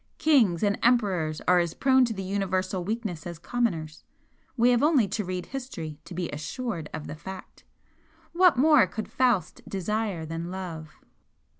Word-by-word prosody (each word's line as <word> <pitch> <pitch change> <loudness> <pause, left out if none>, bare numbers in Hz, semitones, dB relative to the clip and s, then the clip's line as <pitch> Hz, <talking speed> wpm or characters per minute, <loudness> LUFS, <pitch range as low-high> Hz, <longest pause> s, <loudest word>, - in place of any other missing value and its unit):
Kings 235 - +3
and 205 0 +1
emperors 190 -10 +2
are 180 0 +5
as 170 -1 -1
prone 260 -1 +4
to 230 - -3
the 195 - -4
universal 190 -1 -1
weakness 205 -5 -4
as 170 -1 -6
commoners, 165 -7 -2 0.5
we 240 +1 +5
have 240 - +3
only 290 -8 +4
to 210 +2 -2
read 180 -1 -4
history 170 - -6
to 170 - -9
be 175 -1 -2
assured 165 - -4
of 155 -1 -6
the - - -6
fact. 190 +4 -10 0.7
What 355 -4 +5
more 290 -6 +6
could 220 - -5
Faust 240 -10 +1
desire 195 -2 -2
than 165 +2 -5
love?" 175 -4 -6
190 Hz, 160 wpm, -27 LUFS, 170-240 Hz, 0.7 s, more